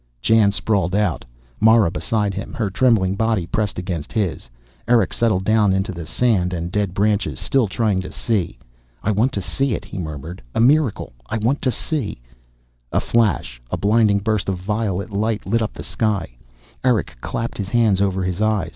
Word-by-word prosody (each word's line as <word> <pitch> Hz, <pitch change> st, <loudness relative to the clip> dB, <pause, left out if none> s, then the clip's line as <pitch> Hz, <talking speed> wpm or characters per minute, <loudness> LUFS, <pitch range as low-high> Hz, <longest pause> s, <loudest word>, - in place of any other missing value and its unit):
Jan 105 Hz, -, +4 dB
sprawled 95 Hz, -1 st, 0 dB
out, 105 Hz, -6 st, 0 dB, 0.4 s
Mara 110 Hz, -5 st, +5 dB
beside 100 Hz, +4 st, -1 dB
him, 100 Hz, +2 st, -6 dB
her 105 Hz, -4 st, -2 dB
trembling 110 Hz, -5 st, +3 dB
body 110 Hz, -3 st, 0 dB
pressed 105 Hz, +4 st, -2 dB
against 90 Hz, -4 st, -4 dB
his. 95 Hz, -, -2 dB, 0.4 s
Erick 115 Hz, -5 st, +3 dB
settled 105 Hz, -5 st, +1 dB
down 110 Hz, -2 st, +3 dB
into 95 Hz, 0 st, 0 dB
the 85 Hz, -3 st, -7 dB
sand 90 Hz, -2 st, +1 dB
and 85 Hz, +1 st, -4 dB
dead 100 Hz, -2 st, -1 dB
branches, 105 Hz, +1 st, +1 dB
still 135 Hz, -5 st, +1 dB
trying 100 Hz, -1 st, 0 dB
to -, -, -8 dB
see. 100 Hz, -7 st, -1 dB, 0.5 s
"I 105 Hz, -, +1 dB
want 110 Hz, +6 st, +2 dB
to 100 Hz, -, -2 dB
see 135 Hz, +6 st, -1 dB
it," -, -, -7 dB
he -, -, -7 dB
murmured. 80 Hz, +1 st, -6 dB
"A -, -, +1 dB
miracle. 135 Hz, -, +2 dB, 0.2 s
I -, -, -1 dB
want 120 Hz, +6 st, 0 dB
to 130 Hz, -, +1 dB
see 130 Hz, -, -3 dB, 0.4 s
" -, -, -41 dB
A -, -, +2 dB
flash, 95 Hz, -, 0 dB
a -, -, -2 dB
blinding 105 Hz, 0 st, +3 dB
burst 105 Hz, -1 st, -1 dB
of 95 Hz, -, -1 dB
violet 100 Hz, +1 st, -2 dB
light, 110 Hz, +1 st, -1 dB
lit 115 Hz, +4 st, +1 dB
up 110 Hz, -, -2 dB
the -, -, -8 dB
sky. 100 Hz, -, -1 dB, 0.5 s
Erick 125 Hz, -4 st, +1 dB
clapped 115 Hz, -1 st, -4 dB
his 100 Hz, -1 st, -3 dB
hands 110 Hz, -5 st, +3 dB
over 95 Hz, -1 st, +1 dB
his 90 Hz, +2 st, -2 dB
eyes. 110 Hz, -5 st, +1 dB
105 Hz, 185 wpm, -21 LUFS, 90-110 Hz, 0.5 s, Mara